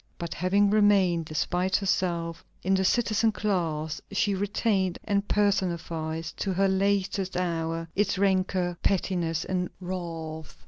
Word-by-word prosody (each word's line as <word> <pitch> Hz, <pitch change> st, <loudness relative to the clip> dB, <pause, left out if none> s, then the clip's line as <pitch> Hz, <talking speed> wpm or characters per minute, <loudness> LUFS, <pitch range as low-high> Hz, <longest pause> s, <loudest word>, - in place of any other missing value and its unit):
But 170 Hz, -1 st, -4 dB
having 200 Hz, +3 st, +2 dB
remained, 195 Hz, -5 st, +4 dB
despite 180 Hz, +4 st, 0 dB
herself, 170 Hz, -4 st, 0 dB, 0.2 s
in 190 Hz, -, +2 dB
the 190 Hz, 0 st, +2 dB
citizen 220 Hz, +2 st, +2 dB
class, 165 Hz, -8 st, -1 dB
she 200 Hz, 0 st, +1 dB
retained 195 Hz, -1 st, 0 dB
and 200 Hz, -1 st, 0 dB
personified, 170 Hz, -5 st, 0 dB
to 195 Hz, -, -1 dB
her 195 Hz, +2 st, +3 dB
latest 195 Hz, -1 st, 0 dB
hour, 165 Hz, -2 st, -1 dB
its 200 Hz, -1 st, +1 dB
rancor, 185 Hz, -2 st, +1 dB
pettiness, 170 Hz, -4 st, 0 dB
and 180 Hz, -1 st, -1 dB
wrath. 165 Hz, -4 st, -6 dB
185 Hz, 125 wpm, -27 LUFS, 170-200 Hz, 0.2 s, remained